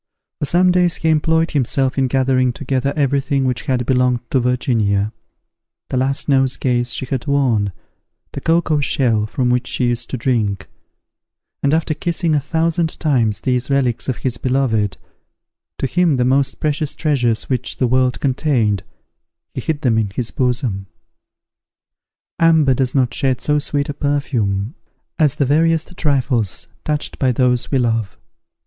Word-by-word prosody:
For - - -1
some 180 +4 +3
days 180 -1 +2
he 160 - -1
employed 160 +1 +2
himself 135 -1 0
in 135 -1 +1
gathering 130 -1 +1
together 135 +1 -1
every 140 -2 +1
thing 135 -1 0
which 125 -1 -2
had 125 -2 0
belonged 125 -2 +2
to 130 - +3
Virginia, 115 -4 0 0.8
the 130 - -2
last 135 +2 0
nosegays 130 -3 +1
she 130 - -3
had 130 +1 -4
worn, 125 -8 +1 0.6
the - - -6
cocoa 165 -2 +2
shell 120 -6 +1
from 125 +2 0
which 125 0 0
she 125 - -1
used 120 -1 -2
to 130 - -3
drink; 110 -6 -1 0.9
and 140 - +2
after 160 0 +1
kissing 165 +1 -1
a 150 - +3
thousand 165 +2 -1
times 120 -9 +1
these 125 +1 -1
relics 135 -3 0
of 130 - -1
his 120 -2 0
beloved, 125 -6 0 0.8
to - - -2
him 170 0 +2
the 125 - +1
most 135 +1 +1
precious 150 -1 -1
treasures 125 -8 0
which 125 -2 -3
the 130 - +1
world 130 +1 +1
contained, 125 - +1 0.7
he - - -4
hid 155 -2 -2
them 115 -5 +2
in 105 -2 -1
his 120 -2 -2
bosom. 125 -6 -1 1.5
Amber 160 -5 +4
does 130 +1 0
not 130 -3 +2
shed 130 -3 +1
so 150 0 +1
sweet 145 0 -1
a 145 - -3
perfume 125 -7 -1 0.5
as 150 -5 +3
the 140 - +1
veriest 165 +4 +1
trifles 130 - 0 0.2
touched 150 -1 -2
by 130 -2 +2
those 125 0 +1
we 135 - +1
love. 115 -5 -1
130 Hz, 155 wpm, -18 LUFS, 120-145 Hz, 1.5 s, Amber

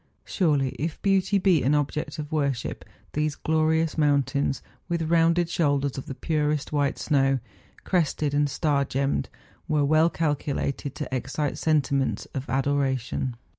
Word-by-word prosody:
Surely 145 -8 +1
if 160 +2 -3
beauty 195 0 +3
be 185 -5 +3
an 140 +4 +2
object 150 +2 -2
of 150 0 -6
worship, 140 -5 -1 0.3
those 150 0 0
glorious 160 0 +1
mountains, 140 -2 +1 0.3
with 170 -1 0
rounded 170 +1 +4
shoulders 145 -5 +1
of 135 - -6
the 135 - -5
purest 150 -1 -1
white 145 -2 +1
snow, 135 -3 +2 0.5
crested 155 -5 0
and 145 0 +2
star 145 -1 +1
gemmed, 135 +1 -1 0.4
were 150 -2 +2
well 155 +3 +4
calculated 145 -3 -2
to 130 - -4
excite 135 +3 -2
sentiments 140 -4 +1
of 135 0 -5
adoration. 135 -2 0
145 Hz, 135 wpm, -26 LUFS, 140-160 Hz, 0.5 s, rounded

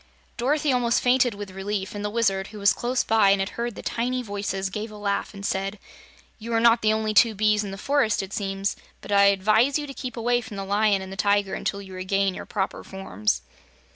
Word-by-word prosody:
Dorothy 285 +4 +1
almost 240 -2 +2
fainted, 245 -2 +3
with 200 -1 -7
relief, 195 +1 -4
and 205 0 -5
the 210 - -1
Wizard, 195 -4 0
who 215 - -11
was 200 0 +4
close 245 +1 -1
by 220 -3 +4
and 195 0 +4
had 195 +1 -1
heard 235 -1 -4
the - - -9
tiny 250 +2 -1
voices, 200 -2 -3
gave 215 +3 -4
a 215 - -11
laugh 200 -1 -2
and 200 -1 -8
said: 195 +2 -2 0.6
"You 230 +1 -5
are 225 - +3
not 230 0 +5
the 215 - +3
only 220 0 0
two 215 +3 +5
bees 215 +1 +2
in 200 - -5
the 195 - -6
forest, 265 -3 +1
it 195 - -8
seems, 195 -1 -2 0.3
but - - -9
I 200 0 +6
advise 215 +7 +3
you 300 - -4
to 275 - -8
keep 255 -3 -6
away 240 +1 +1
from 215 -3 -9
the 195 - -4
Lion 200 0 +2
and 190 - -9
the - - -9
Tiger 200 0 +2
until 200 0 -3
you 190 -1 -11
regain 190 +1 0
your - - -8
proper 195 -2 -3
forms." 105 - -2
205 Hz, 230 wpm, -25 LUFS, 195-230 Hz, 0.6 s, I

